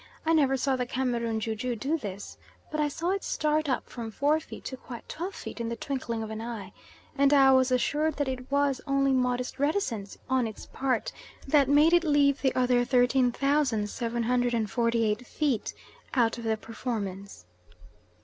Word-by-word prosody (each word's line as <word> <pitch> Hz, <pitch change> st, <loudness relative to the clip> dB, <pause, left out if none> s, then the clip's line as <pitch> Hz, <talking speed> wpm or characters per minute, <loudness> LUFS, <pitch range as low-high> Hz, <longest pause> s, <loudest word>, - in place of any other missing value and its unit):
I 325 Hz, -, +3 dB
never 275 Hz, -4 st, +3 dB
saw 270 Hz, +1 st, +1 dB
the 250 Hz, -1 st, -2 dB
Cameroon 235 Hz, -3 st, -1 dB
ju 220 Hz, 0 st, -2 dB
ju 240 Hz, +3 st, -3 dB
do 275 Hz, +8 st, -1 dB
this, 205 Hz, -9 st, -6 dB, 0.4 s
but 310 Hz, -, -2 dB
I 300 Hz, -, +2 dB
saw 330 Hz, +5 st, -2 dB
it 395 Hz, 0 st, -2 dB
start 305 Hz, 0 st, 0 dB
up 255 Hz, -, -1 dB
from 230 Hz, -2 st, -6 dB
four 290 Hz, +7 st, +1 dB
feet 315 Hz, -, -11 dB
to 265 Hz, -, -4 dB
quite 245 Hz, -2 st, -10 dB
twelve 360 Hz, +4 st, -5 dB
feet -, -, -8 dB
in 230 Hz, -, -2 dB
the 235 Hz, -, -3 dB
twinkling 235 Hz, -2 st, -3 dB
of 220 Hz, -, -6 dB
an 220 Hz, 0 st, -5 dB
eye, 225 Hz, -5 st, -6 dB, 0.4 s
and 280 Hz, 0 st, +4 dB
I 270 Hz, -2 st, +6 dB
was 260 Hz, -1 st, +4 dB
assured 295 Hz, +5 st, +1 dB
that 285 Hz, -1 st, -1 dB
it 255 Hz, -1 st, -5 dB
was 280 Hz, -1 st, +1 dB
only 275 Hz, 0 st, +2 dB
modest 250 Hz, 0 st, 0 dB
reticence 275 Hz, -, -1 dB
on 260 Hz, -2 st, +1 dB
its 220 Hz, -, -9 dB
part 260 Hz, -3 st, -1 dB, 0.4 s
that 275 Hz, -1 st, +4 dB
made 300 Hz, +4 st, +5 dB
it 345 Hz, 0 st, +5 dB
leave 290 Hz, -3 st, +3 dB
the 265 Hz, -, +1 dB
other 250 Hz, -1 st, +3 dB
13,748 240 Hz, -3 st, +1 dB
feet 275 Hz, -8 st, -1 dB, 0.4 s
out 235 Hz, -2 st, +2 dB
of 230 Hz, -, -7 dB
the 220 Hz, -1 st, +1 dB
performance. 200 Hz, -, -5 dB
255 Hz, 175 wpm, -28 LUFS, 230-280 Hz, 0.4 s, I